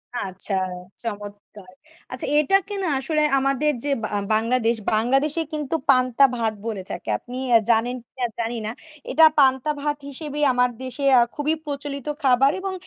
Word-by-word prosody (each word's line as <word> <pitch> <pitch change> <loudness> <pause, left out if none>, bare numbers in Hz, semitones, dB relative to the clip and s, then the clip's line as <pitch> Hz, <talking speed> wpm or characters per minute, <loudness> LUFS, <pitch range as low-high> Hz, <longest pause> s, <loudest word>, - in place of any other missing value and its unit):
আচ্ছা, 195 -2 -4 0.5
চমৎকার। 205 -3 -8 0.4
আচ্ছা 255 - -2
এটাকে 390 +5 +1
না - - 0
আসলে 305 +2 0 0.2
আমাদের 275 +2 +1
যে 290 - 0
বা - - 0 0.3
বাংলাদেশ; 230 +1 +1 0.2
বাংলাদেশে 270 +8 +1
কিন্তু 300 0 -1
পান্তা-ভাত 250 -3 +3
বলে 200 -4 -4
থাকে। 170 - -6
আপনি 250 - -9 0.3
জানেন 235 +2 +2
কিনা, 255 +1 -4
জানি 230 +1 -2
না। 220 - -3 0.4
এটা 320 - +7
পান্তা-ভাত 285 +2 +2
হিসেবে 295 +1 -6
আমার 250 0 +3
দেশে 260 +2 -6 0.2
আ - - +6
খুবই 300 +2 0
প্রচলিত 280 -1 -5 0.2
খাবার 270 +2 +4
এবং 385 0 -4
260 Hz, 140 wpm, -23 LUFS, 230-295 Hz, 0.5 s, এটা